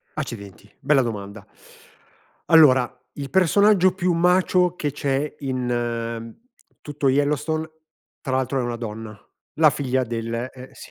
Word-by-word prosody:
accidenti, 105 -8 -7
bella 140 0 +3
domanda. 100 -3 -6 1.1
Allora 130 -6 +6 0.2
il 140 -2 -6
personaggio 190 +2 +4
più 185 -1 0
macho 180 +1 +2
che 150 -4 -2
c'è 140 +1 -2
in 120 -3 -3 0.5
tutto 145 -1 -2
Yellowstone 150 +3 0 0.5
tra 130 -3 -3
l'altro 130 +1 -1
è - - 0
una 120 0 -3
donna, 110 -2 -7 0.4
la 155 -1 +5
figlia 130 -2 -1
del 115 -1 -4 0.2
eh, 130 0 -12
sì, - - -13
135 Hz, 125 wpm, -22 LUFS, 120-155 Hz, 1.1 s, Allora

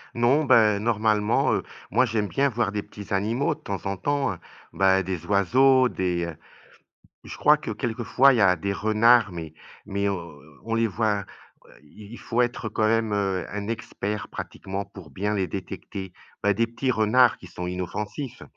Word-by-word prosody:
Non, 125 +6 +3
ben, 105 -5 +5
normalement, 105 -1 +1
heu, - - 0 0.3
moi, 125 +6 +4
j'aime 110 -3 -1
bien 140 +6 +1
voir 115 -3 -1
des 105 0 -2
petits 100 -1 -9
animaux 115 +10 0
de - - -22
temps 100 - -6
en 100 0 -1
temps, 140 +3 0
heu, - - -10 0.4
bah, 95 0 +3
des 90 -2 -4
oiseaux, 130 +7 +4
des, 90 -2 -1
heu 85 -2 -6 0.9
je - - -8
crois - - +5
que - - -7
quelques 120 0 -3
fois, 135 +4 +5
il - - +1
y - - +3
a 95 -3 +5
des 100 +4 -2
renards 110 +2 +4
mais 80 -3 -7 0.3
mais 100 +1 -2
heu, - - +1 0.5
on 115 - -2
les 115 0 +2
voit, 105 -1 0 0.4
heu, - - -19
i 100 +8 -14
il 120 - -9
faut 120 +1 0
être 120 -1 -2
quand 110 0 0
même, 115 -1 +1
heu, 95 -3 -1
un 100 0 -5
expert 105 -2 -4
pratiquement 95 +1 -6
pour 95 -4 -13
bien 105 +2 -2
les 95 -2 0
détecter, 95 0 -7 0.3
bah, 100 -1 +3
des 115 +3 +1
petits 125 +3 -2
renards 115 +2 +4
qui - - -13
sont 90 0 -6
inoffensifs. 105 - -5
105 Hz, 190 wpm, -25 LUFS, 95-115 Hz, 0.9 s, ben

